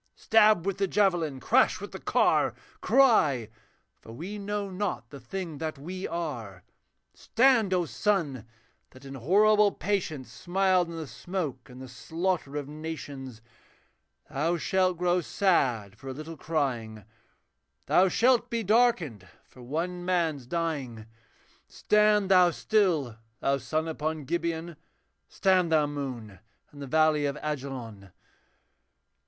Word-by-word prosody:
Stab 215 -5 +4
with 195 -1 -2
the 195 - +1
javelin, 175 -9 +1
crash - - +3
with - - -8
the - - -8
car! - - +2 0.3
Cry! 185 - +3 0.5
for 115 - -13
we 180 - -7
know 205 0 -3
not 185 - -4
the 140 - -9
thing 160 +4 -6
that 155 -2 -4
we 180 +7 -6
are. 120 - -5 0.5
Stand, 235 -5 +2
O 180 -2 +1
sun! 155 - -1 0.4
that 130 +1 -16
in 135 - -8
horrible 205 - +4
patience 155 - -3
Smiled 180 +6 +1
on 170 - -7
the 160 - -5
smoke 140 - -5
and 125 0 -12
the 130 - -8
slaughter 160 +5 -3
of 145 -2 -4
nations. 145 -6 -7 0.8
Thou 165 +5 -1
shalt 185 +1 +1
grow 180 +1 +1
sad 130 - 0
for 135 - -11
a 130 - -4
little 155 +4 -8
crying, 120 -10 -3 0.8
Thou 185 - +4
shalt 245 +3 +3
be 230 -1 -2
darkened 195 - +2 0.2
for 130 - -17
one 170 +8 -3
man's 165 -8 -1
dying 140 -9 -3 0.6
Stand 210 -2 +2
thou 180 -2 +6
still, 170 - 0 0.2
thou 140 0 +1
sun 155 +5 -2
upon 155 -1 -3
Gibeon, 170 +2 -3 0.5
Stand 185 -4 +2
thou, 155 -2 +4
moon, 130 -9 -6 0.3
in 145 - -13
the 140 - -6
valley 155 0 +3
of 140 +1 -3
Ajalon!' 130 -9 -5
160 Hz, 135 wpm, -28 LUFS, 135-190 Hz, 0.8 s, thou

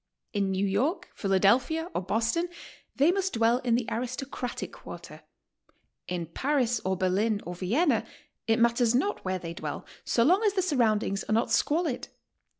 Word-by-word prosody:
In 200 -2 +1
New 190 +1 0
York, 235 - 0
Philadelphia 235 - +2
or - - -1
Boston 230 - 0 0.5
they 290 +5 +4
must 380 0 -1
dwell 230 +1 +3
in 240 -3 +1
the 240 -1 0
aristocratic 250 +1 -4
quarter; - - -10 0.9
in 175 -2 -3
Paris 245 - 0
or 190 0 0
Berlin 200 +4 +1
or 175 - -5
Vienna 230 - +1 0.4
it 225 0 +3
matters 235 0 +3
not 395 +11 0
where 185 0 -1
they 170 -2 -6
dwell, - - -5 0.2
sio 230 - +2
long 365 - +4
as 415 -3 +3
the 380 -2 +1
surroundings 220 - +1
are - - -1
not 225 - +1
squalid. 310 -4 +1
235 Hz, 155 wpm, -28 LUFS, 195-285 Hz, 0.9 s, they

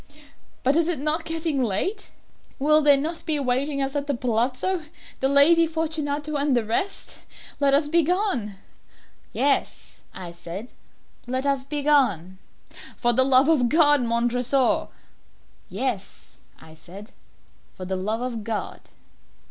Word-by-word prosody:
But 270 +3 +2
is 335 0 +2
it 350 - -1
not 305 +4 -2
getting 320 -4 -1
late? 245 - -2 0.5
Will 305 +2 +4
not 295 +3 +3
they - - -11
be 315 - 0
awaiting 275 +1 0
us 270 +1 -4
at 285 0 -2
the 285 - -1
palazzo, 255 +9 -1 0.3
the 265 - +1
Lady 325 +4 +5
Fortunato 305 -2 -3
and 280 -2 +1
the 230 - -1
rest? 375 - -3 0.4
Let 280 -1 +4
us 290 +1 +2
be 335 +3 +3
gone." 340 - -1 0.8
"Yes," 280 0 -1
I 180 -2 -8
said, 175 +7 -9 0.6
"let 260 +2 -2
us 275 -2 0
be 290 +1 -4
gone." 200 - +1 0.6
"For 240 0 +2
the 260 +2 +5
love 265 +1 +5
of 275 -7 +3
God, 295 -2 +4
Montresor!" 240 +2 0 0.8
"Yes," 215 -1 -4 0.2
I 160 0 -15
said, 190 +7 -13 0.6
"for 185 - -8
the 190 +1 -3
love 210 +5 -3
of 240 -3 -4
God!" 220 -1 -5
275 Hz, 140 wpm, -23 LUFS, 235-305 Hz, 0.8 s, Lady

